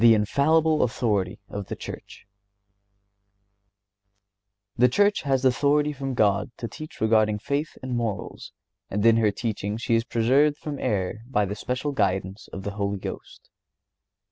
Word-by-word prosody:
INFALLIBLE 145 Hz, +9 st, +4 dB
AUTHORITY 105 Hz, -6 st, 0 dB
OF 100 Hz, -1 st, -5 dB
THE -, -, -4 dB
CHURCH. -, -, -9 dB, 2.5 s
The 125 Hz, +1 st, +5 dB
Church 205 Hz, +9 st, +3 dB
has 135 Hz, -2 st, 0 dB
authority 145 Hz, +3 st, +3 dB
from 135 Hz, -1 st, -4 dB
God 105 Hz, -2 st, +2 dB
to 115 Hz, -, -4 dB
teach 155 Hz, +5 st, -10 dB
regarding 110 Hz, -1 st, +3 dB
faith 140 Hz, +7 st, -3 dB
and 130 Hz, -1 st, -3 dB
morals, 115 Hz, -4 st, -4 dB, 0.4 s
and 105 Hz, +2 st, -1 dB
in 115 Hz, 0 st, +6 dB
her 110 Hz, -2 st, +3 dB
teaching 105 Hz, 0 st, -3 dB
she 115 Hz, 0 st, -1 dB
is 115 Hz, 0 st, +3 dB
preserved 130 Hz, +6 st, +2 dB
from 145 Hz, -2 st, -6 dB
error 100 Hz, +1 st, -1 dB
by 105 Hz, -6 st, +2 dB
the 100 Hz, -, -4 dB
special 125 Hz, +7 st, -3 dB
guidance 95 Hz, -4 st, -1 dB
of 95 Hz, -, -8 dB
the 100 Hz, -, -3 dB
Holy 100 Hz, -1 st, -2 dB
Ghost. -, -, -9 dB
115 Hz, 145 wpm, -25 LUFS, 105-140 Hz, 2.5 s, in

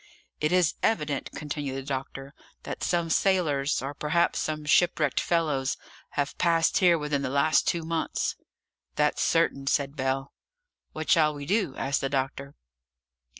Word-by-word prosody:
"It 150 Hz, -, 0 dB
is 180 Hz, -3 st, +3 dB
evident," 150 Hz, -10 st, 0 dB
continued 145 Hz, -2 st, -4 dB
the 135 Hz, -, -4 dB
doctor, 135 Hz, 0 st, -5 dB, 0.3 s
"that -, -, -6 dB
some 170 Hz, -2 st, 0 dB
sailors, 155 Hz, -10 st, +1 dB
or 135 Hz, +2 st, -4 dB
perhaps 150 Hz, +4 st, +1 dB
some 155 Hz, -1 st, -3 dB
shipwrecked 150 Hz, -2 st, +3 dB
fellows, 150 Hz, -6 st, 0 dB, 0.4 s
have 140 Hz, -1 st, -1 dB
passed 165 Hz, +2 st, +3 dB
here 175 Hz, -3 st, +5 dB
within 150 Hz, -2 st, -1 dB
the 135 Hz, -, -2 dB
last 140 Hz, +3 st, +2 dB
two 170 Hz, -1 st, 0 dB
months." 165 Hz, 0 st, -2 dB, 0.6 s
"That's -, -, +1 dB
certain," 135 Hz, 0 st, +1 dB
said 140 Hz, 0 st, 0 dB
Bell. 135 Hz, 0 st, -2 dB, 0.6 s
"What 155 Hz, 0 st, -3 dB
shall 155 Hz, -2 st, +4 dB
we 145 Hz, -1 st, -7 dB
do?" 190 Hz, -4 st, 0 dB
asked 140 Hz, +1 st, -1 dB
the 135 Hz, -, -1 dB
doctor. 140 Hz, +1 st, -3 dB
150 Hz, 150 wpm, -27 LUFS, 140-165 Hz, 0.6 s, here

